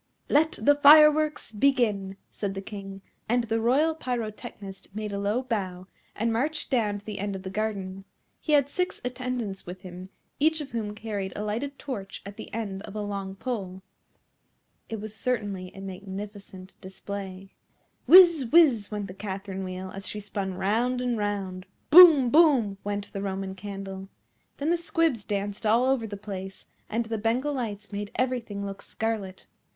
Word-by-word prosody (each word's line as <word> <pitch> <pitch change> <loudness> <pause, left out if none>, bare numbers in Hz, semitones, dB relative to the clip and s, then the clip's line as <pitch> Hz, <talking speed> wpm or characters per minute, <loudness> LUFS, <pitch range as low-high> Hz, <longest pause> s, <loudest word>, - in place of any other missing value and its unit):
"Let 315 +2 +4
the 255 +7 +4
fireworks 300 0 +6
begin," 210 -5 +1
said 200 -2 -4
the 195 - -4
King; 195 -1 -8 0.3
and 240 +1 +2
the 225 0 -1
Royal 280 +8 +3
Pyrotechnist 215 -7 -6
made 215 -1 -4
a 200 - -2
low 210 +5 0
bow, 190 -7 -3 0.3
and 225 +1 0
marched 295 +8 -1
down 215 -5 +1
to 205 - -14
the 210 -2 -5
end 200 0 -2
of 190 - -7
the 190 - -6
garden. 195 -2 -3 0.3
He 305 - -1
had 285 -2 +5
six 360 +5 -2
attendants 250 -7 -4
with 180 +1 -8
him, 185 0 -9 0.3
each 315 +2 +3
of 290 -3 -7
whom 215 -3 -3
carried 205 -3 -4
a 210 - -3
lighted 245 +7 -3
torch 200 -9 -6
at 200 0 -8
the - - -9
end 200 -4 -4
of 200 - -10
a 210 - -2
long 200 -2 -4
pole. 195 -5 -5 1.1
It 225 - -4
was 215 0 -7
certainly 205 -5 -2
a 195 - -9
magnificent 195 0 -8
display. 190 0 -7 0.5
Whizz! 340 -6 +8
Whizz! 270 -11 +5
went 210 -1 -3
the 185 - -8
Catherine 195 -1 -5
Wheel, 185 0 -6
as 195 0 -7
she 210 - -5
spun 200 -2 -4
round 225 +7 +1
and 250 -1 0
round. 200 -3 -3 0.2
Boom! 310 -7 +9
Boom! 270 - +4
went 205 0 -4
the 195 - -4
Roman 195 -1 -3
Candle. 195 0 -7 0.5
Then 295 +4 0
the 345 - +3
Squibs 330 - +1
danced 205 +1 -3
all 225 +3 +4
over 260 -4 +1
the 205 -1 -6
place, 195 -2 -7 0.2
and 230 +2 -1
the 225 -1 -3
Bengal 245 +7 0
Lights 215 -6 -4
made 205 0 -4
everything 235 -6 -2
look 195 0 -6
scarlet. 215 -4 -3
210 Hz, 170 wpm, -27 LUFS, 195-250 Hz, 1.1 s, Boom